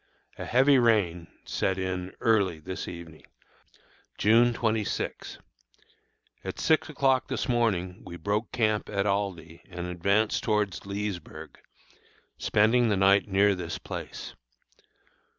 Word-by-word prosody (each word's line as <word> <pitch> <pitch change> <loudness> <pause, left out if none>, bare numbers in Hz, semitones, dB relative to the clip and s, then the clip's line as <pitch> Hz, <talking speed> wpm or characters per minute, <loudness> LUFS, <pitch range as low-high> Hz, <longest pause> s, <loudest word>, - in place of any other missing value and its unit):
A - - -4
heavy 135 +3 +4
rain 95 -8 +2 0.2
set 95 -1 -1
in 95 -1 -3
early 100 -7 +2
this 90 +4 -6
evening. 85 -2 -10 0.9
June 115 +4 +5
26. 110 -3 -2 1.1
At - - -6
six 160 0 +2
o'clock 135 -3 +1
this - - -2
morning 100 -7 0
we 85 - -9
broke 105 +6 -2
camp 110 -2 0
at 100 -1 -1
Aldie 95 -5 -2
and 90 0 -6
advanced 100 +5 +1
towards 105 -4 -1
Leesburg, 100 -6 -6 0.8
spending 115 +3 +3
the 105 - +1
night 100 +2 +4
near 100 +1 +3
this 85 -3 -5
place. - - -7
100 Hz, 115 wpm, -27 LUFS, 90-110 Hz, 1.1 s, June